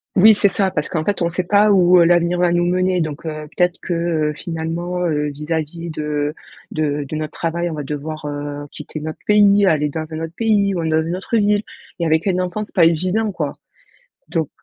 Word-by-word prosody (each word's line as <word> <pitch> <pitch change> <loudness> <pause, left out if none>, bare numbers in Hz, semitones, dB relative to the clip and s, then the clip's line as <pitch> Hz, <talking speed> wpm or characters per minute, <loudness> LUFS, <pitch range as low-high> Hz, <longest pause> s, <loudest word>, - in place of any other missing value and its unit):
Oui, 215 +3 +8
c'est 200 -1 +3
ça! 190 -1 0
Parce - - -2
qu'en 160 -2 -2
fait 205 -3 -1
on 170 - +2
sait 180 +2 -2
pas 205 +3 +4
où, 180 -2 +6
heu, - - +7
l'avenir 175 +1 +3
va 175 -1 +3
nous 175 0 +2
mener 185 0 +1
donc, 155 0 -4
heu, 155 -1 -5
peut-être 180 -1 +2
que, 175 - -3
heu, 165 -3 0
finalement, 170 +2 -3
heu, 150 -2 0
vis-à-vis 160 +3 -4
de 150 -1 -2 0.4
de 150 -2 -1
de 155 - -5
notre 155 0 -3
travail, 170 +1 -2
on - - -5
va 150 - -4
devoir, 150 +2 -5
heu, 145 0 -5
quitter 155 +1 -7
notre 155 0 -6
pays, 205 -1 +5
aller 150 -3 +2
dans 155 +2 -4
un 155 - -4
autre 165 0 -5
pays, 205 -3 +2
ou 170 - -2
dans 160 0 +2
une 170 +2 -2
autre 210 +5 -1
ville 205 0 +2 0.4
et 170 - 0
avec 160 +4 +1
un 185 -1 +1
enfant, 185 +4 -2
c’est - - -24
pas 170 -3 +6
évident, 185 +6 +1
quoi. 150 -6 -3 0.8
Donc 160 -3 -1
170 Hz, 220 wpm, -19 LUFS, 155-185 Hz, 0.8 s, Oui